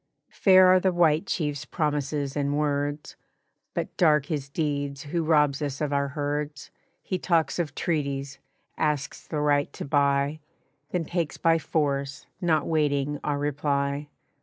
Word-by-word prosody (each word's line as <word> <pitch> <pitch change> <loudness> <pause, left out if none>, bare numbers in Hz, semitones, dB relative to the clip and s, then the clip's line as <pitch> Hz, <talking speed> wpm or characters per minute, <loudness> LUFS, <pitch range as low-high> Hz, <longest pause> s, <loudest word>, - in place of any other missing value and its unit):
"Fair 185 -1 +6
are 185 0 +6
the 190 0 +2
White 170 0 +3
Chief's 145 -4 -2
promises 145 -3 -2
and 145 0 0
words, 145 0 -1 0.6
But - - -3
dark 150 -4 +4
his 145 -3 -3
deeds 145 -2 -2
who 165 +3 -2
robs 150 -3 +3
us 145 -1 -3
of 150 -2 -1
our 140 0 +1
herds. 145 0 -4 0.3
He 185 - -2
talks 170 -1 +1
of 150 -5 -2
treaties, 140 -4 -2 0.4
asks 150 -1 -1
the 155 - -2
right 145 -1 +2
to - - -6
buy, 140 +1 +1 0.5
Then 175 -3 -1
takes 170 -2 -2
by 165 0 +3
force, 140 -3 -1 0.2
not 160 -4 +2
waiting 145 -2 0
our 145 -1 0
reply. 145 0 -1
145 Hz, 145 wpm, -26 LUFS, 140-155 Hz, 0.6 s, Fair